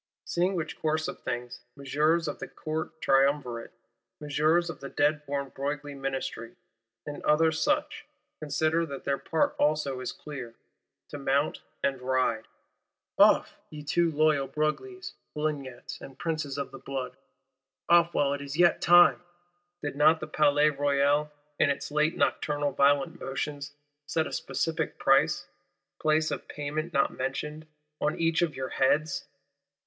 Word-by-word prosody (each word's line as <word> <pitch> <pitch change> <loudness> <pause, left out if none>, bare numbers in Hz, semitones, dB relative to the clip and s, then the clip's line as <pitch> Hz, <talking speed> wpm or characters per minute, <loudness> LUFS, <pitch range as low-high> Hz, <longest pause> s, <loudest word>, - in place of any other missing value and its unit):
Seeing 180 +3 0
which 165 -2 -4
course 155 0 0
of - - -6
things, 120 -1 -4 0.2
Messeigneurs 150 +4 +1
of - - -4
the - - -5
Court 160 0 -5
Triumvirate, 135 -3 +1 0.5
Messieurs 155 +4 +2
of 165 - -6
the 140 - -7
dead 150 +1 +1
born 140 -1 -2
Broglie 145 +2 -4
Ministry, 135 -4 -4 0.5
and 145 0 -6
others 160 +1 +3
such, - - 0 0.3
consider 155 +2 +1
that 140 -2 -7
their 140 0 0
part 160 - 0
also 145 -3 +1
is 130 - -4
clear: 130 -6 -8 0.5
to 145 - -7
mount 140 +2 0 0.2
and 135 -2 0
ride. 125 -3 0 0.7
Off, - - +5
ye 150 -1 -9
too 170 +3 +2
loyal 155 -3 +2
Broglies, 370 - -3 0.2
Polignacs, 145 -5 -4
and 135 -1 -11
Princes 155 -4 -3
of 140 - -4
the 135 - -10
Blood; 130 -1 -5 0.7
off 170 0 +5
while 140 -1 +2
it 140 - -4
is 140 +1 -6
yet 175 -1 +4
time! 175 +1 +6 0.6
Did 145 -2 -3
not 155 +3 +5
the - - -4
Palais 150 0 +3
Royal 145 +1 +2 0.3
in 145 - +4
its 140 - -2
late 150 +2 +1
nocturnal 145 -1 0
"violent 145 +5 +2
motions," 145 +1 -4 0.3
set 160 -1 0
a - - -7
specific 165 -1 -2
price 135 0 +3 0.5
(place 155 0 +2
of - - -4
payment 150 +3 -4
not 140 -4 +2
mentioned) 150 +4 -4 0.3
on 150 - 0
each 165 0 +2
of 170 -3 0
your 130 0 -4
heads? 140 +1 +1
145 Hz, 145 wpm, -28 LUFS, 140-155 Hz, 0.7 s, time